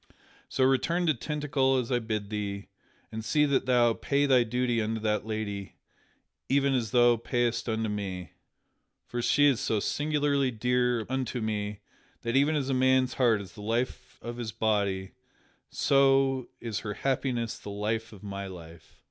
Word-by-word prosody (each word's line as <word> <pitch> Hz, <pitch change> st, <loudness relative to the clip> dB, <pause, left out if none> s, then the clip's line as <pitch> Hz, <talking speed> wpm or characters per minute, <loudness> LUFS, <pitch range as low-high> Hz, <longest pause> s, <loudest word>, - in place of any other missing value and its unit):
So 130 Hz, -, +1 dB
return 165 Hz, +7 st, +2 dB
to 155 Hz, -, +3 dB
Tintagel 140 Hz, -1 st, 0 dB
as 125 Hz, 0 st, -4 dB
I 125 Hz, -, +2 dB
bid 110 Hz, -3 st, -4 dB
thee, 100 Hz, -1 st, -4 dB, 0.4 s
and 110 Hz, 0 st, -5 dB
see 150 Hz, +6 st, +3 dB
that 140 Hz, -2 st, +1 dB
thou 120 Hz, -2 st, +4 dB
pay 140 Hz, +4 st, 0 dB
thy 130 Hz, -3 st, +5 dB
duty 120 Hz, 0 st, 0 dB
unto 110 Hz, +1 st, -2 dB
that 105 Hz, 0 st, -1 dB
lady 100 Hz, -3 st, -4 dB, 0.7 s
even 140 Hz, 0 st, +3 dB
as 120 Hz, -4 st, 0 dB
thou 120 Hz, +1 st, +5 dB
payst 120 Hz, 0 st, -1 dB
it 115 Hz, -, 0 dB
unto 110 Hz, 0 st, -1 dB
me. 95 Hz, -4 st, -4 dB, 0.7 s
For 120 Hz, -, -4 dB
she 145 Hz, +4 st, +4 dB
is 135 Hz, -5 st, +4 dB
so 110 Hz, -5 st, 0 dB
singularly 145 Hz, +1 st, +1 dB
dear 125 Hz, 0 st, +1 dB
unto 130 Hz, -1 st, -2 dB
me 105 Hz, -2 st, -3 dB, 0.4 s
that, 115 Hz, +1 st, -1 dB
even 145 Hz, +3 st, +3 dB
as 140 Hz, -3 st, -1 dB
a 135 Hz, -, 0 dB
man's 130 Hz, 0 st, +3 dB
heart 115 Hz, -5 st, +3 dB
is 95 Hz, -3 st, -10 dB
the 105 Hz, -, -11 dB
life 115 Hz, +4 st, -3 dB
of 120 Hz, 0 st, -6 dB
his 115 Hz, -3 st, -4 dB
body, 100 Hz, -3 st, 0 dB, 0.6 s
so 135 Hz, -2 st, +3 dB
is 115 Hz, -4 st, -3 dB
her 105 Hz, -2 st, -5 dB
happiness 130 Hz, -4 st, -1 dB
the -, -, -9 dB
life 110 Hz, +2 st, -2 dB
of 105 Hz, -2 st, -13 dB
my 100 Hz, -1 st, -5 dB
life." 85 Hz, -3 st, -12 dB
120 Hz, 170 wpm, -28 LUFS, 105-135 Hz, 0.7 s, thy